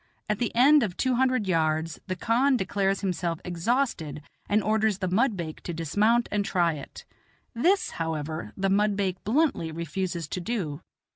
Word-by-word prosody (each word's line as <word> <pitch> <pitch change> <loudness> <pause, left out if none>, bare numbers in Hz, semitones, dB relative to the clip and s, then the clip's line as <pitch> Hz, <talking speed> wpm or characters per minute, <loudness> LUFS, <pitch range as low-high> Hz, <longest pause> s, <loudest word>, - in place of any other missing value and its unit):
At 210 -1 -1
the 240 - 0
end 280 +5 +6
of 195 -7 -2
two 260 -1 +1
hundred, 255 -4 +1
yards 160 -2 0
the 185 - -2
khan 250 +8 +2
declares 195 -1 0
himself 175 -4 -2
exhausted 175 - -1 0.3
and 210 0 +2
orders 215 -1 +2
the 185 -1 -2
mudbake 185 - 0
to 175 - -5
dismount 210 +9 +2
and 210 -1 +1
try 175 -4 +1
it; 145 -3 -10 0.5
this, 360 +12 +2
however, 160 -1 -3
the 195 0 0
mudbake 200 -2 +1
bluntly 245 - +1
refuses 170 +1 -3
to 180 - -3
do. 175 -8 -3
195 Hz, 155 wpm, -27 LUFS, 165-230 Hz, 0.5 s, end